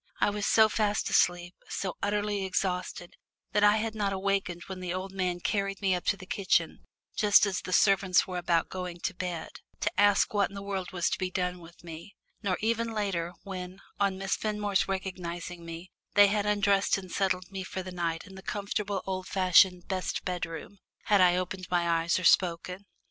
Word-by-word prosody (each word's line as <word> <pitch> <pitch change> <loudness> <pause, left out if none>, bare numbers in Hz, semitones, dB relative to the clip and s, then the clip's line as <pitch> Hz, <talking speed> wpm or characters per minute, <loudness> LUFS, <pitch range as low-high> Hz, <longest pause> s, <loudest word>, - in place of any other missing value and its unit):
I - - +3
was 205 0 -2
so 220 -1 +6
fast 210 -1 0
asleep, 175 0 +2 0.2
so 185 -3 -3
utterly 205 0 0
exhausted, 180 -1 -2 0.4
that 210 0 +2
I 210 +1 +6
had 220 0 -2
not 205 -2 -1
awakened 190 -3 -1
when 190 -1 -7
the 180 -1 -3
old 185 +1 -5
man 180 -2 -2
carried 195 0 -1
me 195 -2 +2
up 180 - -2
to 200 - +1
the 190 - -11
kitchen, 195 0 0 0.3
just 210 0 +5
as 195 -2 -2
the - - -7
servants 190 -1 +4
were 185 -2 -4
about 170 -1 +1
going 180 -2 -6
to 205 - -2
bed, 175 -3 -4 0.3
to 210 - 0
ask 205 0 +4
what 205 -2 +2
in 200 - -12
the 200 - -6
world 195 -2 -3
was 175 -2 0
to - - -1
be 185 -1 -1
done 180 -1 -2
with 170 0 -15
me; 165 +4 -10 0.3
nor 195 -4 0
even 230 +1 0
later, 185 -5 -2
when, 185 -1 -7 0.2
on 200 -2 +1
Miss 195 0 -1
Fenmore's 210 -2 0
recognising 180 -2 -5
me, 170 +2 -8 0.2
they 205 -1 +7
had 210 0 0
undressed 200 -1 +2
and 185 -2 -9
settled 185 -1 -1
me 190 -1 -4
for 185 0 -5
the 185 - -7
night 170 -2 -2
in 195 - -13
the 190 - -10
comfortable 200 0 -3
old 185 -1 -3
fashioned 185 -1 +4
"best 185 -1 -3
bedroom," 180 +2 -5 0.2
had 205 -2 +4
I 180 -1 +5
opened 185 0 -3
my 175 -1 +1
eyes 165 0 +2
or 185 - -3
spoken. 180 +2 +2
190 Hz, 195 wpm, -29 LUFS, 180-200 Hz, 0.4 s, they